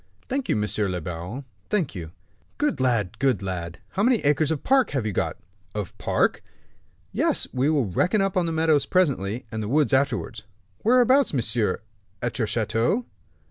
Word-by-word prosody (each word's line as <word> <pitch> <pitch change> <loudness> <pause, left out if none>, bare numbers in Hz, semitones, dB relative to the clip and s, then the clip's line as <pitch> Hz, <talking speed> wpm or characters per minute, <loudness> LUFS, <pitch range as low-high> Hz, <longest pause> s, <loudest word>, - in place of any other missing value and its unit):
"Thank 270 0 -2
you, - - +3
monsieur 105 -1 0
le 90 -1 -2
baron, 90 - -6 0.2
thank 185 -10 0
you." 85 -5 -7 0.5
"Good 295 0 0
lad, 115 -5 0
good 130 -8 +2
lad! 85 -3 -4
How 195 - -2
many 245 +3 +4
acres 145 +1 +2
of 160 -3 -2
park 265 -3 +4
have 120 - -1
you 110 - 0
got?" - - -1 0.4
"Of 105 -4 -4
park?" - - +1 0.7
"Yes; - - +1
we 130 +3 +2
will 145 -5 +2
reckon 180 - +1
up 195 -1 +1
the 180 - +2
meadows 160 -2 +2
presently, 125 - +1
and 110 - -3
the 105 - -3
woods 145 +1 +2
afterwards." 130 -4 0 0.4
"Whereabouts, 255 - +4
monsieur?" 115 -6 0 0.4
"At 120 +4 -3
your 110 - +1
chateau." 115 - 0
130 Hz, 170 wpm, -25 LUFS, 105-175 Hz, 0.7 s, many